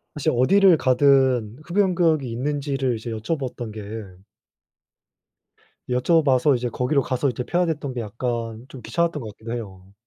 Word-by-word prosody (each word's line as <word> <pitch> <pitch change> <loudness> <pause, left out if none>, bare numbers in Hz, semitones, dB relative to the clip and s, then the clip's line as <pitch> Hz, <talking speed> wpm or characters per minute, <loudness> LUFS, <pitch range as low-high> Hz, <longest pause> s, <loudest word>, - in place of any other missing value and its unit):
사실 150 - 0
어디를 190 +7 +5
가든 130 -4 +3
흡연구역이 170 - +1
있는지를 135 0 -1
이제 115 +1 -6
여쭤봤던 120 0 -4
게 105 0 -7 2.1
여쭤봐서 135 0 +3
이제 120 0 -2
거기로 125 +4 0
가서 130 +2 -1
이제 125 0 -3
피워야 175 +6 +1
됐던 145 -5 -3
게 120 - -3
약간 115 +1 -4
좀 130 - -11
귀찮았던 165 +7 -1
것 110 - -6
같기도 115 +1 -8
해요. 95 -5 -8
130 Hz, 330 characters per minute, -23 LUFS, 120-150 Hz, 2.1 s, 어디를